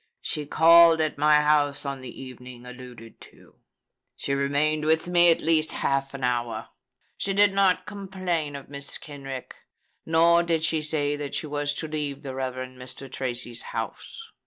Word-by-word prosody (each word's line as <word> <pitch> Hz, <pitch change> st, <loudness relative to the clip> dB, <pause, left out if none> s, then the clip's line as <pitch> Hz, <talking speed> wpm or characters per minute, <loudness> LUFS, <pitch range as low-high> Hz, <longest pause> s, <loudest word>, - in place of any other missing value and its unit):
She 150 Hz, -1 st, -3 dB
called 165 Hz, +1 st, +7 dB
at 155 Hz, -2 st, -1 dB
my 150 Hz, 0 st, +5 dB
house 150 Hz, -1 st, +2 dB
on 140 Hz, -1 st, -4 dB
the 130 Hz, -, -8 dB
evening 125 Hz, -1 st, -11 dB
alluded 125 Hz, -2 st, -12 dB
to. -, -, -22 dB, 0.6 s
She 140 Hz, -, -3 dB
remained 145 Hz, +2 st, +1 dB
with 160 Hz, +2 st, +2 dB
me 175 Hz, -1 st, +5 dB
at 165 Hz, -, +3 dB
least 160 Hz, -1 st, +2 dB
half 135 Hz, 0 st, -1 dB
an 135 Hz, -, -7 dB
hour. 120 Hz, -2 st, -2 dB, 0.5 s
She 195 Hz, -1 st, -2 dB
did 205 Hz, -1 st, +5 dB
not 185 Hz, -2 st, +2 dB
complain 185 Hz, -7 st, -3 dB
of 140 Hz, -, -8 dB
Mrs. 140 Hz, 0 st, -6 dB
Kenrick; 135 Hz, -3 st, -8 dB, 0.5 s
nor 170 Hz, +1 st, +4 dB
did 165 Hz, -2 st, 0 dB
she 160 Hz, -1 st, +1 dB
say 150 Hz, -1 st, -1 dB
that 145 Hz, -1 st, -5 dB
she -, -, -2 dB
was 145 Hz, -1 st, -2 dB
to 160 Hz, -, -4 dB
leave 150 Hz, -2 st, -4 dB
the 135 Hz, -2 st, -6 dB
Rev. 130 Hz, -1 st, -3 dB, 0.2 s
Mr. 130 Hz, +1 st, -10 dB
Tracy's 120 Hz, -2 st, -4 dB, 0.2 s
house. 455 Hz, -, -6 dB
145 Hz, 165 wpm, -25 LUFS, 135-160 Hz, 0.6 s, called